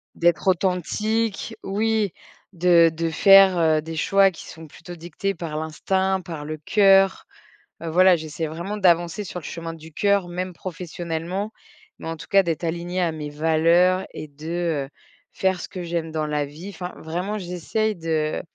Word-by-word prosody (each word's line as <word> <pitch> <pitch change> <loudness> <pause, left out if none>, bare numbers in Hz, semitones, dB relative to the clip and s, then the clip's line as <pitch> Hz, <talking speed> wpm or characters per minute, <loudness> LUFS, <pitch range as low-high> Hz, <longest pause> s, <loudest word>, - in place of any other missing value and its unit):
d'être 170 +2 +1
authentique, 200 +4 -1
oui, 215 0 0 0.4
de 170 -2 +5
de 165 +1 -2
faire, 195 +2 +7
heu, 155 -2 +3
des 160 +1 -7
choix 195 +4 +4
qui 170 - -12
sont 160 0 -11
plutôt 175 +4 -11
dictés 175 +4 -4
par 160 -3 -5
l'instinct, 190 +5 -1
par 160 -4 -7
le 155 0 -5
cœur, 195 - +4 0.6
heu, - - -4
voilà, 185 +2 +5
j'essaie 160 0 -5
vraiment 170 +7 -5
d'avancer 175 +1 +2
sur 180 -1 -6
le - - -13
chemin 165 -1 -6
du 160 -1 -13
cœur, 200 -1 +2
même 180 +1 -4
professionnellement, 175 +2 -5 0.5
mais 165 - -6
en 165 - -4
tout - - -11
cas 195 -3 +5
d'être 170 0 -2
alignée 175 +2 -3
à 170 -2 0
mes 150 -2 -6
valeurs 165 +5 +3
et 155 - -7
de, 155 0 -3
heu, - - -22 0.5
faire 190 -1 +1
ce - - -6
que 185 - -6
j'aime 170 -1 -3
dans 155 -1 -1
la 150 -1 -1
vie, 155 +7 -10
enfin, 180 -2 -7
vraiment 180 +6 -4
j'essaye 185 +4 -2
de, 160 -2 -1
175 Hz, 170 wpm, -23 LUFS, 160-190 Hz, 0.6 s, faire